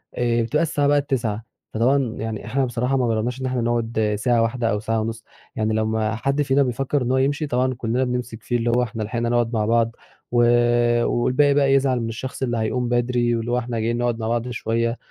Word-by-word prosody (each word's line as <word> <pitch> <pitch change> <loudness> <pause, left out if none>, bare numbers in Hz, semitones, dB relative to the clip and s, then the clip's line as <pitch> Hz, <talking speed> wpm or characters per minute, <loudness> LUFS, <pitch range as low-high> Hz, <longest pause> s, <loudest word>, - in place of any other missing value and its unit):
آآ 120 -1 +1
بتبقى 150 +8 +1
الساعة 145 -3 0
بقِت 145 0 +2
21:00، 115 -4 -1 0.3
فطبعًا 125 +1 +1
يعني 110 -1 -4
إحنا 135 0 0
بصراحة 125 +2 -1
ما 125 -2 +1
جرّبناش 115 +3 -1
إن - - -2
إحنا 130 -1 -1
نقعد 115 -2 0
ساعة 120 0 +2
واحدة 115 0 0
أو 105 - 0
ساعة 110 +1 -1
ونص، 115 0 -4 0.3
يعني 110 0 0
لما 110 0 0
حد 140 +5 0
فينا 140 0 +3
بيفكر 135 +3 -1
إن 125 0 -1
هو 130 - +2
يمشي، 145 +3 0
طبعًا 130 -1 +1
كلنا 120 +1 -1
بنمسك 125 -3 -4
فيه، 120 - 0
اللي 120 0 -1
هو 120 +1 +2
إحنا 115 -2 -4
لحقنا 115 +2 -2
نقعد 120 0 +1
مع 110 -2 +1
بعض، 115 +1 +1 0.4
و - - +2 0.7
والباقي 130 +4 +2
بقى 140 -1 +3
يزعل 135 -2 +2
من 115 -1 -3
الشخص 125 +4 -6
اللي 120 -2 -1
هيقوم 120 +2 -1
بدري، 120 0 +1
واللي 115 +1 -3
هو 120 - +2
إحنا 120 -1 -4
جايين 115 +2 -1
نقعد 120 -1 -1
مع 110 - -3
بعض 120 +1 -1
شوية 115 0 -1
120 Hz, 220 wpm, -22 LUFS, 115-130 Hz, 0.7 s, فينا